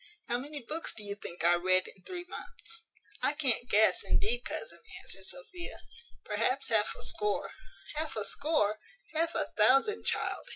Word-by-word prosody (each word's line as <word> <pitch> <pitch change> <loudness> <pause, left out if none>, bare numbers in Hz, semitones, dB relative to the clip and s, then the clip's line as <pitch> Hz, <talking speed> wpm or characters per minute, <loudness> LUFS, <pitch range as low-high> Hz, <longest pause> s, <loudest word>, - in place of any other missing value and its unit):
How 240 +1 +1
many 285 +1 -7
books 325 +2 -2
do 215 - -4
you 200 0 -2
think 180 -4 -6
I 170 +1 +6
read 185 +1 +3
in 190 - -14
three 355 - -6
months?" 340 -6 -8 0.4
"I - - +3
can't 255 -5 +3
guess, 215 +1 +5
indeed, 465 +4 +2
cousin," - - -4 0.2
answered - - -7
Sophia. 365 -8 -6 0.5
"Perhaps 270 +1 +1
half 215 -2 +3
a - - -7
score." 210 -1 0 0.4
"Half 310 0 -2
a 215 -2 -1
score! 250 -9 +1 0.3
half 330 +1 +1
a - - 0
thousand, 270 - +4
child!" - - 0
265 Hz, 165 wpm, -32 LUFS, 210-330 Hz, 0.5 s, I